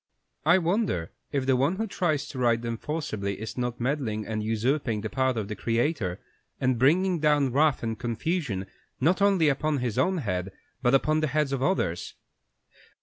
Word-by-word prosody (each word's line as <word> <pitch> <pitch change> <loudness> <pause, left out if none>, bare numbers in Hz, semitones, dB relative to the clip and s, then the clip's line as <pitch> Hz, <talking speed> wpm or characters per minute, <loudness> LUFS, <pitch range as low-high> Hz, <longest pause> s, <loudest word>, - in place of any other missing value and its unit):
I 170 +3 +7
wonder 175 - 0 0.2
if 140 -3 -1
the 130 -1 +3
one 140 +8 +2
who 220 +3 -1
tries 155 -8 -1
to 130 - -6
right 120 -2 +3
them 115 0 -3
forcibly 110 -9 -3
is 110 0 -6
not 125 -1 -3
meddling, 120 -5 -1
and 110 -1 -3
usurping 115 +1 0
the 110 - -5
part 130 -2 +1
of 105 -3 -2
the 105 - -4
Creator, 115 - -1 0.4
and 130 -2 +1
bringing 175 +7 +3
down 145 -3 +3
wrath 145 +1 +2
and 115 -1 -3
confusion 120 - -2 0.3
not 175 +8 +2
only 195 -5 +4
upon 150 +1 +1
his 125 -4 -1
own 185 0 +2
head, 95 - -2 0.3
but 125 +1 +4
upon 155 +3 +2
the 155 - +1
heads 150 0 0
of 135 -2 -1
others? 110 - -1
130 Hz, 180 wpm, -27 LUFS, 115-155 Hz, 0.4 s, I